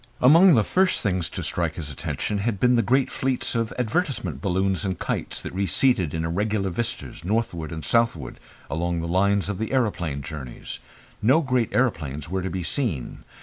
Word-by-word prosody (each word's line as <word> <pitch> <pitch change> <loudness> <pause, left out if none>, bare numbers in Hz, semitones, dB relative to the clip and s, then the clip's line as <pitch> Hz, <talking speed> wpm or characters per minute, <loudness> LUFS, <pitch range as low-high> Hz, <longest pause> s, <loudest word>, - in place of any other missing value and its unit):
Among 165 +6 +7
the 110 - +4
first 185 - +2
things 90 - 0
to - - -5
strike 85 -3 -1
his 75 -4 -6
attention 100 +8 -3
had 100 -1 -1
been 125 +2 +4
the 115 - +4
great 130 +3 +2
fleets 130 -1 -1
of 115 -2 -1
advertisement 120 - -1
balloons 95 +1 0
and 95 -3 -2
kites - - -3
that - - -6
receded 95 - +2
in 80 0 -1
irregular 100 +3 0
vistas 120 -5 -4
northward 90 -6 -1
and 80 -1 -5
southward 115 0 +1 0.3
along 85 +2 -1
the 85 - -3
lines 100 +2 +2
of 100 -2 -3
the 110 - -2
aeroplane 90 - 0
journeys. 70 -4 -7 0.4
No 135 +9 +4
great 125 -4 +1
aeroplanes 75 - 0
were 95 +3 -2
to 95 - -2
be 90 0 -3
seen. 90 - -3
100 Hz, 180 wpm, -24 LUFS, 85-120 Hz, 0.4 s, Among